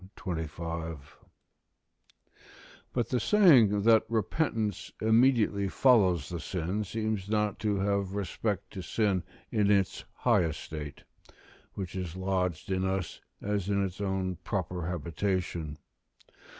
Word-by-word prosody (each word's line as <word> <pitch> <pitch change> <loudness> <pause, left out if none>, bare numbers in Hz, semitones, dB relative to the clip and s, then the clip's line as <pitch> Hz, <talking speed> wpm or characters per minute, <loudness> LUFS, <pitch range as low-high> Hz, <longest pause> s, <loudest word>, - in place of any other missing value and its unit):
25.] 80 -3 -5 1.7
But 120 -2 -1
the 125 - +1
saying 120 - +5
that 110 0 +6
repentance 110 - -1
immediately 110 -3 +3
follows 95 -6 +4
the 85 -1 -5
sin 95 +5 -2
seems 110 -1 -3
not 105 -1 0
to 105 -2 0
have 100 0 0
respect 100 0 -2
to 95 - -6
sin 100 -1 +1 0.3
in 105 -2 +2
its 100 -3 +2
high - - +3
estate, 75 -2 -6 0.7
which 95 -2 -5
is 90 -3 -4
lodged 95 -2 -1
in 95 0 +1
us 95 -2 -2 0.2
as 100 -2 -1
in 100 -1 +2
its 95 +1 -6
own 95 -2 -1
proper 90 -2 -3
habitation. 85 -2 -2
95 Hz, 115 wpm, -29 LUFS, 90-105 Hz, 1.7 s, that